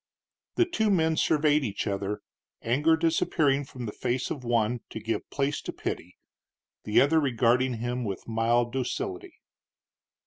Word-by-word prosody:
The 355 Hz, -, +4 dB
two 220 Hz, -, 0 dB
men 160 Hz, -4 st, +3 dB
surveyed 150 Hz, -1 st, +3 dB
each 105 Hz, -5 st, -3 dB
other, 100 Hz, 0 st, -2 dB, 0.4 s
anger 150 Hz, +8 st, +3 dB
disappearing 155 Hz, -3 st, +2 dB
from 125 Hz, -2 st, -8 dB
the 105 Hz, -, -4 dB
face 125 Hz, +3 st, -2 dB
of 135 Hz, -, -4 dB
one 120 Hz, 0 st, +1 dB
to -, -, -6 dB
give 110 Hz, +1 st, -3 dB
place 140 Hz, +1 st, -1 dB
to -, -, -5 dB
pity, 90 Hz, +2 st, -5 dB, 0.7 s
the 105 Hz, -, +4 dB
other 160 Hz, +4 st, +4 dB
regarding 125 Hz, -2 st, +2 dB
him 120 Hz, +2 st, -3 dB
with 100 Hz, -4 st, -5 dB
mild 115 Hz, +1 st, +1 dB
docility. 370 Hz, -, -3 dB
125 Hz, 145 wpm, -27 LUFS, 115-155 Hz, 0.7 s, The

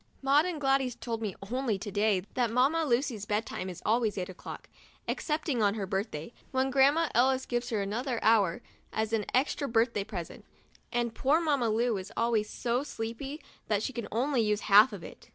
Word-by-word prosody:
Maud 280 Hz, +4 st, +4 dB
and 345 Hz, -4 st, -3 dB
Gladys 270 Hz, -3 st, +1 dB
told 230 Hz, -2 st, -4 dB
me 210 Hz, -4 st, -3 dB, 0.2 s
only 250 Hz, -5 st, 0 dB
to 205 Hz, +1 st, -6 dB
day 205 Hz, -2 st, +2 dB
that 245 Hz, -2 st, +1 dB
Mamma 275 Hz, +8 st, +2 dB
Lucy's 240 Hz, -5 st, 0 dB
bed 210 Hz, +2 st, 0 dB
time 185 Hz, -, -5 dB
is 180 Hz, -1 st, -9 dB
always 220 Hz, -2 st, +1 dB
eight 180 Hz, -1 st, -3 dB
o'clock, 185 Hz, -, -9 dB, 0.4 s
excepting 300 Hz, -5 st, -1 dB
on 205 Hz, 0 st, +3 dB
her 205 Hz, -3 st, -2 dB
birthday, 190 Hz, -1 st, -4 dB, 0.2 s
when 260 Hz, 0 st, 0 dB
Grandma 280 Hz, +5 st, +4 dB
Ellis 260 Hz, +2 st, +3 dB
gives 240 Hz, 0 st, -2 dB
her 215 Hz, -3 st, 0 dB
another 235 Hz, +5 st, -2 dB
hour 205 Hz, -6 st, +3 dB, 0.3 s
as 220 Hz, 0 st, -2 dB
an 215 Hz, -3 st, +1 dB
extra 280 Hz, +2 st, +1 dB
birthday 230 Hz, -3 st, +1 dB
present, 190 Hz, -5 st, -7 dB, 0.5 s
and 240 Hz, -1 st, -1 dB
poor 280 Hz, +7 st, +2 dB
Mamma 285 Hz, -8 st, +1 dB
Lu 225 Hz, 0 st, +1 dB
is 185 Hz, 0 st, -7 dB
always 225 Hz, -2 st, +1 dB
so 240 Hz, +1 st, -1 dB
sleepy 270 Hz, +2 st, -6 dB, 0.2 s
that 210 Hz, -1 st, +1 dB
she 265 Hz, -, -3 dB
can 235 Hz, -2 st, -4 dB
only 250 Hz, +3 st, +1 dB
use 210 Hz, -1 st, +1 dB
half 210 Hz, +4 st, +7 dB
of 200 Hz, -5 st, -8 dB
it. -, -, -12 dB
235 Hz, 190 wpm, -30 LUFS, 210-265 Hz, 0.5 s, half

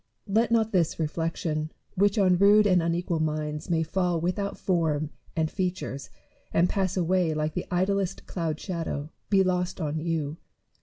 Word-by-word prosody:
Let 220 Hz, +4 st, +2 dB
not 225 Hz, -1 st, +3 dB
this 175 Hz, -4 st, +1 dB
reflection, 160 Hz, -1 st, -2 dB, 0.2 s
which 200 Hz, +3 st, +2 dB
on 185 Hz, -3 st, +4 dB
rude 205 Hz, +2 st, +6 dB
and 185 Hz, -3 st, +4 dB
unequal 170 Hz, 0 st, 0 dB
minds 155 Hz, +1 st, -2 dB
may 165 Hz, -1 st, +2 dB
fall 175 Hz, +1 st, 0 dB
without 190 Hz, +4 st, -2 dB
form 155 Hz, -4 st, 0 dB, 0.2 s
and 160 Hz, -2 st, 0 dB
features 180 Hz, -7 st, -3 dB, 0.4 s
and 170 Hz, -, +3 dB
pass 190 Hz, -1 st, -1 dB
away 175 Hz, -2 st, +2 dB
like 155 Hz, 0 st, -1 dB
the 180 Hz, -, -4 dB
idlest 190 Hz, +1 st, 0 dB
cloud 160 Hz, -4 st, -3 dB
shadow, 165 Hz, -5 st, -4 dB, 0.2 s
be 195 Hz, -2 st, +5 dB
lost 180 Hz, -1 st, -1 dB
on 155 Hz, -2 st, -2 dB
you. 160 Hz, -2 st, -2 dB
175 Hz, 155 wpm, -27 LUFS, 155-190 Hz, 0.4 s, rude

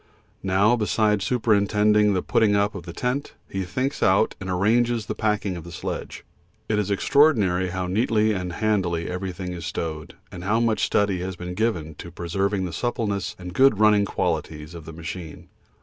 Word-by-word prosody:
Now, 95 Hz, +5 st, +3 dB
besides 105 Hz, -2 st, +1 dB
superintending 105 Hz, -2 st, +3 dB
the 90 Hz, -, 0 dB
putting 105 Hz, -2 st, +3 dB
up 100 Hz, +1 st, +1 dB
of 90 Hz, -3 st, -8 dB
the -, -, -5 dB
tent, 125 Hz, -, -2 dB
he 95 Hz, 0 st, -3 dB
thinks 130 Hz, +10 st, -2 dB
out -, -, +3 dB
and 95 Hz, -, -5 dB
arranges 115 Hz, +5 st, +2 dB
the -, -, -3 dB
packing 105 Hz, -3 st, -1 dB
of 85 Hz, -, -7 dB
the 85 Hz, -, -10 dB
sledge; 80 Hz, -, -6 dB, 0.4 s
it 105 Hz, -1 st, +1 dB
is 105 Hz, -1 st, -1 dB
extraordinary 100 Hz, -, +3 dB
how 95 Hz, 0 st, -3 dB
neatly 110 Hz, +3 st, +2 dB
and 90 Hz, -3 st, -3 dB
handily 95 Hz, -6 st, 0 dB
everything 90 Hz, 0 st, -4 dB
is 85 Hz, -2 st, -6 dB
stowed, 80 Hz, -2 st, -5 dB, 0.2 s
and 90 Hz, -, -8 dB
how 105 Hz, +4 st, +1 dB
much 115 Hz, -2 st, +1 dB
study 100 Hz, -3 st, +1 dB
has 95 Hz, +1 st, -4 dB
been 90 Hz, 0 st, -6 dB
given 90 Hz, -7 st, -1 dB
to -, -, -7 dB
preserving 95 Hz, +3 st, -1 dB
the 85 Hz, -, -5 dB
suppleness 105 Hz, -4 st, -2 dB
and 90 Hz, -1 st, -8 dB
good 135 Hz, -3 st, +5 dB
running 105 Hz, -1 st, +5 dB
qualities 80 Hz, -4 st, -3 dB
of 85 Hz, -3 st, -9 dB
the 80 Hz, -, -8 dB
machine. 80 Hz, 0 st, -8 dB
100 Hz, 180 wpm, -24 LUFS, 90-110 Hz, 0.4 s, good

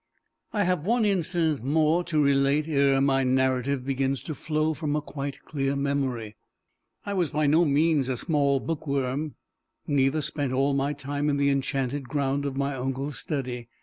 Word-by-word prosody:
I 210 Hz, -3 st, +1 dB
have 180 Hz, -4 st, 0 dB
one 230 Hz, +4 st, +2 dB
incident 170 Hz, -, +1 dB
more 155 Hz, +5 st, +2 dB
to 155 Hz, -2 st, 0 dB
relate 140 Hz, +1 st, +3 dB
ere 140 Hz, -3 st, +3 dB
my 135 Hz, -1 st, +3 dB
narrative 130 Hz, 0 st, +1 dB
begins 135 Hz, 0 st, -1 dB
to 155 Hz, -, -4 dB
flow 155 Hz, +1 st, -1 dB
from 150 Hz, -2 st, -2 dB
a -, -, +2 dB
quite 140 Hz, -1 st, -6 dB
clear 140 Hz, -2 st, -1 dB
memory. 135 Hz, -6 st, -2 dB, 0.7 s
I 205 Hz, -, -3 dB
was 180 Hz, -5 st, +1 dB
by 150 Hz, +2 st, 0 dB
no 160 Hz, +4 st, +4 dB
means 145 Hz, -2 st, +2 dB
a 130 Hz, -, -1 dB
small 140 Hz, -2 st, +1 dB
bookworm, 140 Hz, -2 st, -2 dB, 0.5 s
neither 145 Hz, +1 st, +1 dB
spent 140 Hz, -4 st, -2 dB
all 135 Hz, +2 st, +2 dB
my 140 Hz, +1 st, 0 dB
time 145 Hz, +1 st, -2 dB
in 140 Hz, -, +1 dB
the 140 Hz, 0 st, +3 dB
enchanted 135 Hz, -1 st, -2 dB
ground 140 Hz, 0 st, 0 dB
of 135 Hz, -1 st, -3 dB
my 140 Hz, 0 st, 0 dB
uncle's 135 Hz, +1 st, -3 dB
study. 125 Hz, -5 st, -4 dB
140 Hz, 170 wpm, -26 LUFS, 135-155 Hz, 0.7 s, no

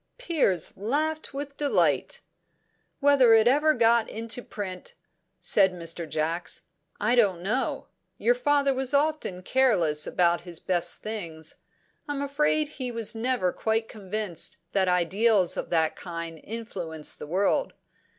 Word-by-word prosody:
'" -, -, -50 dB
Piers 310 Hz, -, 0 dB
laughed 305 Hz, +10 st, -1 dB
with 280 Hz, +1 st, -6 dB
delight. 290 Hz, -1 st, +1 dB, 0.8 s
"Whether 275 Hz, -5 st, +6 dB
it 220 Hz, +1 st, +5 dB
ever 300 Hz, +4 st, +4 dB
got 230 Hz, -1 st, +3 dB
into 230 Hz, +2 st, -4 dB
print," 190 Hz, -5 st, -7 dB, 0.4 s
said 190 Hz, -2 st, +3 dB
Mr. 165 Hz, -1 st, -5 dB
Jacks, 165 Hz, +3 st, -2 dB, 0.4 s
"I 215 Hz, +3 st, +1 dB
don't 200 Hz, -8 st, +3 dB
know. 235 Hz, +7 st, -1 dB, 0.3 s
Your 485 Hz, -, +3 dB
father 290 Hz, -, +2 dB
was 265 Hz, +1 st, -1 dB
often 285 Hz, -11 st, 0 dB
careless 180 Hz, -13 st, +2 dB
about 175 Hz, -1 st, +2 dB
his 170 Hz, -2 st, -8 dB
best 175 Hz, -2 st, -1 dB
things. 170 Hz, -8 st, -6 dB, 0.5 s
I'm 285 Hz, -1 st, -2 dB
afraid 300 Hz, +2 st, +1 dB
he 255 Hz, -4 st, -5 dB
was 230 Hz, -1 st, -2 dB
never 225 Hz, -5 st, 0 dB
quite 220 Hz, 0 st, -1 dB
convinced 195 Hz, -3 st, -4 dB
that 190 Hz, -1 st, +2 dB
ideals 185 Hz, +2 st, +2 dB
of -, -, -4 dB
that 160 Hz, -2 st, +1 dB
kind 165 Hz, -2 st, -7 dB
influence 180 Hz, -9 st, -5 dB
the -, -, -9 dB
world. 195 Hz, -, +1 dB
220 Hz, 135 wpm, -26 LUFS, 180-270 Hz, 0.8 s, Whether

